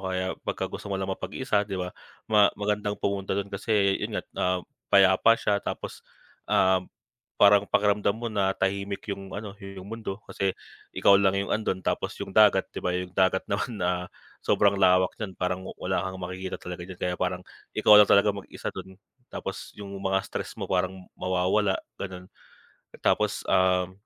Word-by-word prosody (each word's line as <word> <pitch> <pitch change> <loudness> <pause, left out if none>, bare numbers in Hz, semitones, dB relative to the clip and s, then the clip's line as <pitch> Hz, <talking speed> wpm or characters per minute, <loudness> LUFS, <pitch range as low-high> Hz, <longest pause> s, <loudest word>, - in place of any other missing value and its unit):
kaya 95 0 -1
pagka - - -2
gusto - - -7
mo 100 - -1
lang 95 0 -3
mapag-isa 105 +2 -1
'di 100 - -3
ba. 90 -1 -4 0.4
Ma 105 -2 +6
magandang 105 0 -1
pumunta 100 -1 -2
dun, 100 0 -3
kasi 100 -1 +1
yun - - -3
nga, - - -2 0.2
ah, 90 0 +2 0.3
payapa 100 +4 +6
siya 100 -3 0
tapos, - - -6 0.5
um, 95 -1 +3 0.5
parang 100 0 +6
pakiramdam 105 0 +2
mo 120 +1 -4
na 95 -2 +1
tahimik 100 +2 -2
yung 95 -1 -8
ano 105 -1 -6
yung 95 -2 -9
mundo 110 -3 -5
kasi 95 -1 -2 0.4
ikaw 100 - +6
lang 100 -1 +3
yung 100 - -2
andon, 105 -4 -1
tapos - - -1
yung 95 - -5
dagat. 105 -2 +6
'Di - - -5
ba 90 0 -1
yung 90 0 -5
dagat 95 0 +2
naman, 110 +3 -2
ah, 90 0 -1 0.3
sobrang 100 -1 +3
lawak 90 -1 +4
niyan 95 -4 -5
parang 90 0 -2
wala 95 0 -1
kang 95 - -5
makikita 95 +1 -5
talaga 90 -1 -7
niyan, 95 - -8
kaya 90 - 0
parang 90 0 -1 0.3
ikaw 105 - +8
lang 105 - +6
talagang 100 0 +4
mag-isa - - -7
dun. 95 0 -9 0.3
Tapos - - -6
yung 100 -1 -8
mga 95 0 +1
stress - - -5
mo - - -4
parang 95 0 -1
mawawala 95 +2 +1 0.2
ganon. 90 -1 -7 0.7
Tapos, - - +1
um, 90 0 +3
95 Hz, 170 wpm, -27 LUFS, 95-100 Hz, 0.7 s, ikaw